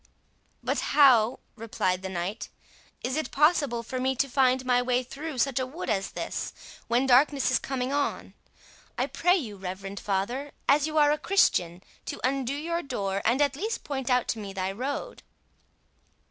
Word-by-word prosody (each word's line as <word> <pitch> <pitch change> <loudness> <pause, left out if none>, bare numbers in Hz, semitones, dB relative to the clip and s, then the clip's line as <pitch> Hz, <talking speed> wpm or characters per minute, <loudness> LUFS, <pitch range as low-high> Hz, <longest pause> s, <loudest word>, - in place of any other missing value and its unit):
"But - - 0 0.2
how," 250 -5 +6
replied 200 -5 -1
the 190 - -5
knight, 185 +4 -4 0.5
"is 255 +1 -1
it 310 - -2
possible 285 -5 +2
for 255 +2 -4
me 265 +1 0
to 275 +2 +1
find 260 -1 +2
my 250 -1 +3
way 250 0 +1
through 285 +3 -7
such 265 +1 +1
a 260 - -1
wood 300 +1 -4
as 195 -2 -1
this, - - -4 0.3
when 240 +3 +2
darkness 270 +1 +4
is 255 - +3
coming 260 0 -3
on? 285 0 -2 0.6
I - - +1
pray 355 +2 +2
you, 225 - -4
reverend 195 +1 -6
father 240 +9 -2
as 285 +2 +4
you 310 0 -3
are 295 -1 +5
a 300 - 0
Christian, 180 - +2 0.2
to - - -5
undo 265 +1 0
your 335 +3 -2
door, 200 - -3
and 250 +6 +3
at 280 -1 0
least 435 +10 -3
point 265 -3 -4
out 250 -1 +2
to 225 - -1
me 200 -2 -7
my 190 0 -1
road." 275 - -4
255 Hz, 175 wpm, -27 LUFS, 215-285 Hz, 0.6 s, how